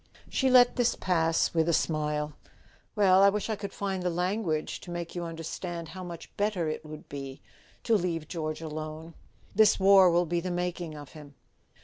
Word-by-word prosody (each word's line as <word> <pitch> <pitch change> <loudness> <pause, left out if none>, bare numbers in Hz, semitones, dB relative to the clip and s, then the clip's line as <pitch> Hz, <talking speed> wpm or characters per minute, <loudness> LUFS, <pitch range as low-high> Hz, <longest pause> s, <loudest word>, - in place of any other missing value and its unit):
She 265 - +2
let 250 -1 +6
this 245 -1 +2
pass 165 -3 +1
with 165 0 +2
a - - +2
smile. 150 -1 0 0.6
"Well, 190 -3 +5
I 200 - +7
wish 210 +2 -2
I - - 0
could 200 -1 -6
find 195 -2 -3
the 180 - 0
language 180 -2 -1
to - - -12
make 175 -1 -5
you 175 - -4
understand 165 0 -6
how 185 +3 -8
much 170 -2 -9
better 205 -5 0
it 155 0 -4
would 155 -1 -10
be 135 -1 -7 0.4
to 230 - +3
leave 170 -5 -1
George 155 -2 -4
alone. 155 +1 -6 0.4
This 215 0 +5
war 190 -1 +7
will 175 +1 +3
be 170 +1 -1
the 185 +2 -4
making 175 -2 -3
of 145 -2 -10
him." 145 -2 -13
170 Hz, 190 wpm, -28 LUFS, 155-190 Hz, 0.6 s, I